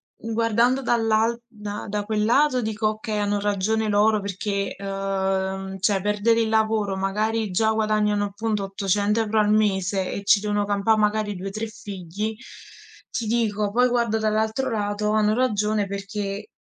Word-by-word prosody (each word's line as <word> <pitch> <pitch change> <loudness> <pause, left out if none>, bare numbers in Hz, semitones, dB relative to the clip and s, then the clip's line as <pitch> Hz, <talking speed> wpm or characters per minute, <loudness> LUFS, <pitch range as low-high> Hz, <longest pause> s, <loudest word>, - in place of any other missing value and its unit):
guardando 230 +3 +1
dall'al 225 -1 +2
da 210 -3 -7
da 205 0 -2
quel 210 0 0
lato, 255 +3 +3
dico: 220 -1 -1
“Okay, 215 0 -3
hanno 205 0 0
ragione 210 +2 0
loro,” 210 +1 +3
perché, 200 0 -3
uhm, 195 -1 -2
cioè, 195 0 +2
perdere 210 +3 +2
il 225 - +2
lavoro, 220 -2 +1
magari 210 +2 -1
già 220 +4 +2
guadagnano 215 -1 +1
appunto 210 0 -2
800 200 +2 0
euro 220 -1 +1
al 210 0 +2
mese 195 -3 +1
e 200 - -5
ci 200 +1 +5
devono 205 0 0
campare 205 +2 +2
magari 210 -1 0
2, 190 +2 -5
3 220 +2 -4
figli. 205 -1 -5 0.8
Ti 240 -1 -3
dico, 215 -3 0
poi 250 +1 +4
guardo 235 -2 +1
dall'altro 220 +4 0
lato, 210 -1 -1
hanno 215 0 +3
ragione, 215 -4 +1
perché 200 0 -5
210 Hz, 150 wpm, -24 LUFS, 200-220 Hz, 0.8 s, ci